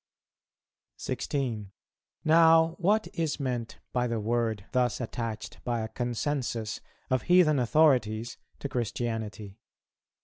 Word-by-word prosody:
[225:1] - - -17
16. 115 -8 -3 0.5
Now 165 0 +6
what 210 +5 +2
is 165 -5 -1
meant 120 -5 -3 0.2
by 125 0 +1
the 115 -1 -1
word 110 -2 -1
thus 125 -3 +1
attached 115 -2 -5
by 120 -2 -1
a 110 - -4
consensus 120 -2 -2 0.3
of 130 -2 +2
heathen 170 -4 +4
authorities 120 -4 +2 0.2
to - - -4
Christianity? 110 -4 -4
120 Hz, 110 wpm, -28 LUFS, 110-145 Hz, 0.5 s, Now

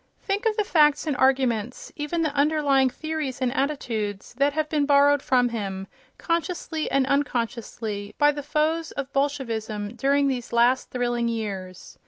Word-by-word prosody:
Think 405 +3 -1
of 435 0 0
the 425 - +2
facts 300 -6 +3
and 300 -3 -1
arguments, 255 -3 0
even 315 +3 -2
the 305 -3 -1
underlying 285 -2 +3
theories 310 -2 -4
and 255 -2 0
attitudes, 230 -9 -2
that 280 +1 +3
have 310 0 -1
been 295 -2 0
borrowed 285 0 +5
from 250 -3 +2
him, 195 -4 -4 0.3
consciously 335 -2 -2
and 275 -1 +2
unconsciously, 230 -6 -2
by 295 0 +5
the 290 0 -5
foes 310 +3 0
of 275 -1 -5
Bolshevism 230 -7 -2
during 280 +2 +2
these 250 -3 -3
last 240 +2 +3
thrilling 240 -1 -1
years! 200 -5 -5
275 Hz, 155 wpm, -25 LUFS, 235-295 Hz, 0.3 s, borrowed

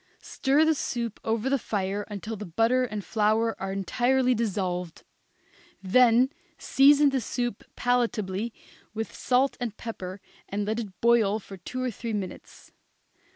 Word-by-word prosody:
Stir 285 +3 +2
the 320 - +4
soup 235 -6 -3
over 225 +2 -1
the 275 0 +2
fire 200 -1 -2
until 210 +2 -5
the 210 - -7
butter 230 +8 +2
and 210 -4 -5
flour 220 +1 +1
are 195 0 -2
entirely 250 +7 +1
dissolved; 185 -7 -2 0.8
then 245 +5 +5 0.3
season 285 +1 +5
the 270 -2 0
soup 240 -1 -3
palatably 230 -4 0 0.4
with 225 +1 -4
salt 260 +2 +1
and 235 -4 -4
pepper 190 -5 -6 0.3
and 205 +1 -2
let 220 +2 -1
it 200 -5 -7
boil 230 -3 +4
for 200 -2 -10
two 255 +8 -5
or 255 - -1
three 230 +1 -5
minutes. 200 -3 -7
225 Hz, 145 wpm, -27 LUFS, 200-250 Hz, 0.8 s, then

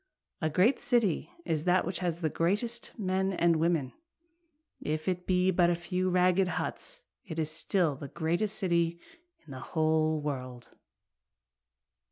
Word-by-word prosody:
A 155 - +1
great 190 - +3
city 235 - +1 0.2
is 155 0 -1
that 180 0 +3
which 180 +1 -2
has 175 -2 -2
the 160 - +1
greatest 210 +8 -1
men 190 -1 0
and 170 -2 +3
women, 160 -5 0 0.9
If 155 +2 -3
it 180 -1 -2
be 185 0 +3
a 175 -1 +3
few 180 +2 -2
ragged 180 +1 +3
huts 180 - -4 0.2
it 160 - -8
is 155 -1 0
still 160 -1 +1
the 140 +1 -8
greatest 175 +9 -1
city 170 -3 +1 0.5
in 150 - -13
the 130 - -7
whole 155 +1 +1
world. 130 -4 -6
175 Hz, 145 wpm, -30 LUFS, 155-185 Hz, 0.9 s, great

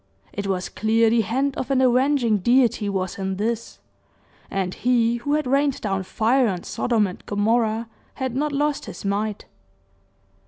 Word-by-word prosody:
It 200 -1 -4
was 185 -2 -1
clear 225 +1 +2
the 230 0 +4
hand 265 +7 -1
of 260 - -3
an 270 -1 +2
avenging 255 -3 +3
Deity 235 -1 +2
was 190 -1 -3
in 190 0 -2
this, 225 +3 -3 0.7
and 190 -2 -2
He 240 -1 +2
who 285 +5 -1
had 305 - 0
rained 275 +1 +1
down 195 -2 -1
fire 235 +7 +2
on 180 -4 -3
Sodom 230 -4 0
and 185 -2 -7
Gomorrah 225 +2 +1 0.3
had 260 -2 -3
not 295 +2 0
lost 290 +1 -1
His - - -9
might. 205 +1 -2
230 Hz, 160 wpm, -23 LUFS, 205-260 Hz, 0.7 s, the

